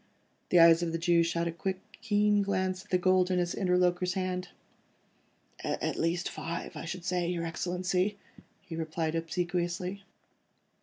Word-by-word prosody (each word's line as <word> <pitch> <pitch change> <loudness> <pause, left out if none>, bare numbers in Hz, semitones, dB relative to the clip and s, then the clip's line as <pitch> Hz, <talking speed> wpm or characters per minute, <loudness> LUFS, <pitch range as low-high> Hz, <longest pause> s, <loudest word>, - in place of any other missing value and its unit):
The 180 - +5
eyes 165 0 +8
of 170 -1 -1
the - - +1
Jew 170 0 +3
shot 170 0 0
a - - -1
quick, 185 +3 -3 0.2
keen 210 -1 +3
glance 190 -1 -1
at 210 - -25
the 180 - +3
gold 185 0 +3
in 185 - +1
his 175 -1 0
interlocutor's 180 -1 +1
hand. 185 -1 -2 1.1
"At - - -1
least 170 +1 0
five, 170 +1 -5
I - - -6
should 175 +1 -6
say, 180 -2 0
your 170 -2 -2
Excellency," 180 +4 -1 0.5
he 185 -4 -7
replied 160 0 -2
obsequiously. 175 +3 -2
180 Hz, 155 wpm, -30 LUFS, 170-185 Hz, 1.1 s, eyes